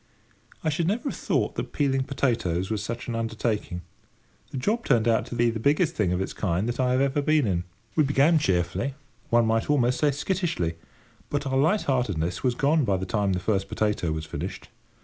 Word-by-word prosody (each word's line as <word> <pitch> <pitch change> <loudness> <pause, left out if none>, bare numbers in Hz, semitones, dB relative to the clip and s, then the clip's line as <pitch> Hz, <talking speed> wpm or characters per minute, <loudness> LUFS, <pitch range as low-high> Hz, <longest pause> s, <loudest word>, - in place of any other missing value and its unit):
I 160 - +1
should 160 +2 0
never 235 - 0
have - - -5
thought - - 0
that - - -5
peeling 135 -2 +1
potatoes 95 -10 0
was 105 -2 -1
such 115 +3 -5
an 120 - -3
undertaking. 110 -5 -2 0.7
The - - -6
job 215 - 0
turned 120 -4 +2
out 115 +1 +2
to 125 - -6
be 120 0 +3
the 115 - -4
biggest 155 - +2
thing 105 - 0
of 90 - 0
its 95 - -3
kind 95 +1 -1
that 120 - -3
I 125 -1 +2
had 130 - +2
ever 140 +1 +1
been 155 -1 +3
in. 90 -4 0 0.3
We 155 - +4
began 145 +3 +4
cheerfully, 95 +6 0 0.3
one 120 -1 +4
might 115 +3 +1
almost 125 -4 +2
say 150 - +4
skittishly, 145 - -1 0.6
but 145 0 -1
our 135 -1 -1
light 155 +10 +3
heartedness 100 - 0
was 125 -2 +1
gone 145 +4 +3
by 100 -5 +1
the 95 - -3
time 100 -1 0
the 90 - 0
first 95 0 -1
potato 105 -6 0
was 80 0 -3
finished. 80 - -6
120 Hz, 210 wpm, -26 LUFS, 100-145 Hz, 0.7 s, We